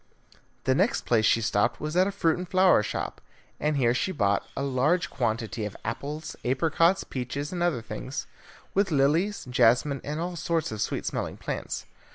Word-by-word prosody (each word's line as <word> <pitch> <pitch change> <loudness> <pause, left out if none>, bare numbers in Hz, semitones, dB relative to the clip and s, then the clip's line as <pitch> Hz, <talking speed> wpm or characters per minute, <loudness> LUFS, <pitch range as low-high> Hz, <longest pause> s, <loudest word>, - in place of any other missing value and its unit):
The - - +3
next - - +1
place 110 -3 +3
she 115 - +4
stopped 105 -2 +2
at - - -23
was 155 +2 -4
a 185 +2 +4
fruit 165 -5 +2
and 180 0 -6
flower 185 - +5
shop, 105 - -4 0.4
and 150 -1 +1
here 120 -3 +3
she 125 +9 0
bought 100 - +1
a 140 - -1
large 140 +6 +1
quantity 115 -3 -2
of 105 -1 -4
apples, 145 +7 -4
apricots, 165 +8 +2
peaches, 140 +3 -4
and 175 - -3
other 170 -10 +1
things, - - -5 0.5
with 195 0 +2
lilies, 160 +8 +2
jasmine, 125 +3 +3
and 150 +2 -3
all 175 +1 -3
sorts 165 -4 -1
of 110 -1 -4
sweet - - -2
smelling - - -3
plants. - - -4
145 Hz, 180 wpm, -27 LUFS, 120-170 Hz, 0.5 s, flower